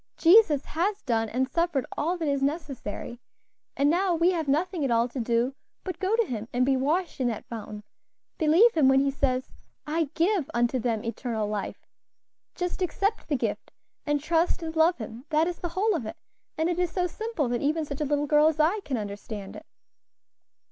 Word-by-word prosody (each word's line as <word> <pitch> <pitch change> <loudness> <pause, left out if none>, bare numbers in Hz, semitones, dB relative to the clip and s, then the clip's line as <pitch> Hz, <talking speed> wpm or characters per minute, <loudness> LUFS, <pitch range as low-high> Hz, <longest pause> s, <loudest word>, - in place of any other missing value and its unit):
"Jesus 335 -6 +5
has 390 +6 -1
done 225 -3 0
and 260 +3 0
suffered 335 -1 0
all 340 +5 -1
that 325 -3 -2
is 280 -1 0
necessary; 275 -6 -4 0.6
and 280 +1 +3
now 355 +3 +2
we 335 +2 +3
have 325 -4 -2
nothing 325 +4 0
at 270 - +1
all 235 0 +3
to 250 +2 -6
do 235 +2 +1 0.3
but 370 - -5
go 390 +3 +1
to 465 -1 +2
Him 225 - -5
and 250 +1 +2
be 270 0 +3
washed 305 +6 0
in 255 - +1
that 225 -3 -3
fountain; 215 -2 -7 0.6
believe 335 +10 +5
Him 305 -5 +4
when 265 0 +5
He 275 0 +1
says, 260 -1 0 0.4
'I 315 0 -1
give 340 -3 +1
unto 240 +2 +1
them 225 -2 -1
eternal 230 -2 -2
life;' 210 -1 -5 0.7
just 360 +1 -3
accept 395 +5 -1
the 290 - 0
gift, - - -3 0.3
and 295 -1 0
trust 335 +3 +1
and 320 0 -5
love 325 +2 +4
Him; 230 +2 -8
that 315 0 +3
is 355 - -4
the 350 - -3
whole 395 +6 +1
of 240 -9 -3
it, - - -7 0.4
and 320 +1 +1
it 350 0 -1
is 355 -2 0
so 360 0 0
simple 435 - -2
that 240 -1 -1
even 305 +2 0
such 285 0 -6
a - - +1
little 290 +1 0
girl 300 +1 +5
as 315 -1 0
I 335 +8 +3
can 280 -10 -3
understand 205 -1 -6
it." - - -11
295 Hz, 205 wpm, -27 LUFS, 250-345 Hz, 0.7 s, Jesus